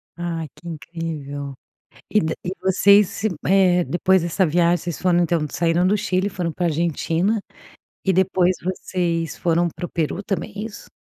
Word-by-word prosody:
Ah, 170 -2 -3
que 175 - -13
incrível. 150 -4 -5 0.6
E 215 - +4
da 160 -4 -1
e 180 - -2
vocês, 200 +2 +4 0.2
eh, 185 -2 +4
depois 185 +1 +2
dessa 175 +3 +1
viagem, 170 +2 +3
vocês 170 -2 -5
foram 180 -2 +3
então, 165 -2 +1
saíram 170 +1 +1
do 205 - +3
Chile, 190 -1 0
foram 180 -4 -3
para 175 - -1
a - - +3
Argentina 170 +5 0 0.6
e 190 - +3
depois 185 0 +2
vocês 175 -2 -2
foram 170 0 +1
para 175 - -8
o - - -13
Peru 165 +4 -2
também, 205 +1 -3
é 205 - -3
isso? 220 -1 -8
175 Hz, 170 wpm, -22 LUFS, 165-190 Hz, 0.6 s, E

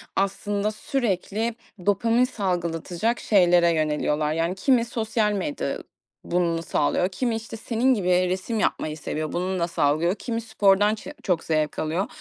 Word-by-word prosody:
aslında 200 +1 0
sürekli 220 -1 -2 0.3
dopamin 230 +4 +3
salgılatacak 180 - -1
şeylere 175 -4 +4
yöneliyorlar. 150 -1 0
Yani, 165 +3 0
kimi 235 +3 +3
sosyal 220 -2 0
medya 285 +9 -2 0.5
bunu 170 -1 0
sağlıyor, 170 +5 +1
kimi 230 +4 -1
işte, 225 0 -6
senin 240 +4 +1
gibi 195 -6 -2 0.2
resim 190 +4 -2
yapmayı 155 -6 -1
seviyor, 155 0 -4
bununla 180 -1 -1
sağlıyor, 165 +3 +1
kimi 230 0 -3
spordan 205 -1 +3
çe 295 +7 -9
çok 180 -4 0
zevk 155 -1 0
alıyor. 165 +6 -1
195 Hz, 135 wpm, -24 LUFS, 170-225 Hz, 0.5 s, şeylere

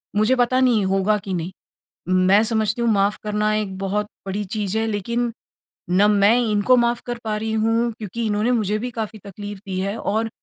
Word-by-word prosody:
मुझे 215 +5 +3
पता 250 +1 +2
नहीं 235 -6 +3
होगा 195 +2 +2
कि 195 -1 -6
नहीं। 175 0 -3 0.6
मैं 185 +3 +4
समझती 220 0 0
हूँ 235 - +2
माफ़ 200 0 +2
करना 210 0 0
एक 200 -3 -3
बहुत 200 +2 -2 0.2
बड़ी 200 +2 -2
चीज़ 205 0 -1
है 225 - +1
लेकिन 235 +3 -1 0.6
ना 190 +4 +4
मैं 210 +3 +4
इनको 210 +5 +4
माफ़ 240 0 +1
कर 240 -1 -4
पा 215 -1 -2
रही 220 +1 -3
हूँ 225 +2 +1
क्योंकि 225 +2 -4
इन्होंने 215 +3 +1
मुझे 215 -3 +1
भी 245 - -3
काफ़ी 220 -1 -5
तकलीफ़ 205 0 -8
दी 185 -1 -3
है 200 +3 -2
और 220 +2 -1
210 Hz, 195 wpm, -22 LUFS, 200-225 Hz, 0.6 s, मैं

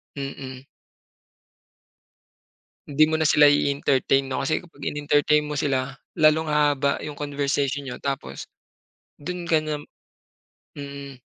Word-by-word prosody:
Mm. 135 -2 -6 2.3
Hindi 145 +2 +4
mo 160 - -3
na 155 -1 +2
sila 150 - +6
i-entertain 140 -1 +3
no 130 - -2
kasi 155 +3 +1
kapag 155 -5 -6
inentertain 150 +1 +2
mo 150 - -4
sila, 135 -2 -1 0.2
lalong 155 +1 +4
hahaba 145 -2 +2
yung 150 - -5
conversation 140 -1 -1
niyo 125 -2 -7
tapos, 130 - -4 0.7
dun 175 +3 -5
ka 160 - +5
na 155 -1 -3 0.9
mm. 140 -2 -8
145 Hz, 115 wpm, -24 LUFS, 135-150 Hz, 2.3 s, sila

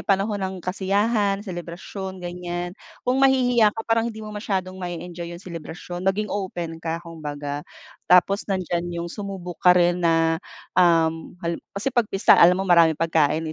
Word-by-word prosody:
panahon 200 +1 0
ng 190 0 -3
kasiyahan, 200 +2 0
selebrasyon 185 +1 -6
ganiyan. 175 0 -5 0.3
Kung 255 +2 +1
mahihiya 245 -4 +4
ka 225 - -4
parang 230 0 +1
hindi 220 -1 -8
mo 215 - -7
masyadong 190 -3 -3
mae-enjoy 175 -1 -6
yung 180 - -14
selebrasyon. 175 +1 -7
Maging 195 +3 0
open 175 -5 -4
ka 165 0 -2
kung 165 -1 -10
baga. 145 -1 -4 0.5
Tapos 185 +3 +5
nandiyan 175 -3 -1
yung 170 0 -5
sumubok 190 -4 -6
ka 180 0 +6
rin 175 0 +3
na, 165 -1 +2 0.3
um, 165 -2 +2
hal 170 0 -2 0.2
kasi 240 +7 -1
pagpista 220 -5 +3
alam 180 +1 +7
mo 195 - -1
maraming 170 -3 +5
pagkain, 160 -1 +1
180 Hz, 155 wpm, -23 LUFS, 170-200 Hz, 0.5 s, alam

